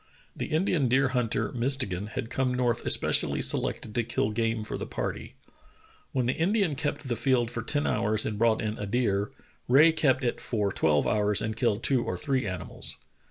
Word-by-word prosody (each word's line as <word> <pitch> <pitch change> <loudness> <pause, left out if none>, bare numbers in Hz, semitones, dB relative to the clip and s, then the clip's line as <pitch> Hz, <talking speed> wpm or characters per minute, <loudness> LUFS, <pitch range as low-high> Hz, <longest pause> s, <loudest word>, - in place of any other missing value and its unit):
The - - -4
Indian 160 -3 +1
deer 135 +2 +3
hunter, 115 -4 -1
Mistegan, 120 -7 -1
had 120 +2 -5
come 130 -1 0
north 120 -2 0
especially - - +3
selected 105 - 0
to 120 - +1
kill 110 -1 -1
game 115 0 -1
for - - -5
the - - -5
party. - - -5 0.8
When 130 -2 0
the 125 - +1
Indian 190 0 +1
kept 145 0 -3
the 120 - -1
field 120 -2 +1
for 120 - -4
ten 145 +5 -1
hours 105 0 +1
and 105 -1 -3
brought 115 -1 +2
in 110 0 -3
a 105 - -4
deer, 100 -3 0 0.4
Rae 145 +6 +6
kept 145 -5 +1
it 120 - -1
for 105 -4 -1
twelve 75 -2 +2
hours 105 -2 +2
and 110 0 -1
killed 115 -2 0
two 130 -3 +2
or - - -3
three 135 -6 -1
animals. 95 -2 -7
120 Hz, 190 wpm, -27 LUFS, 105-135 Hz, 0.8 s, Rae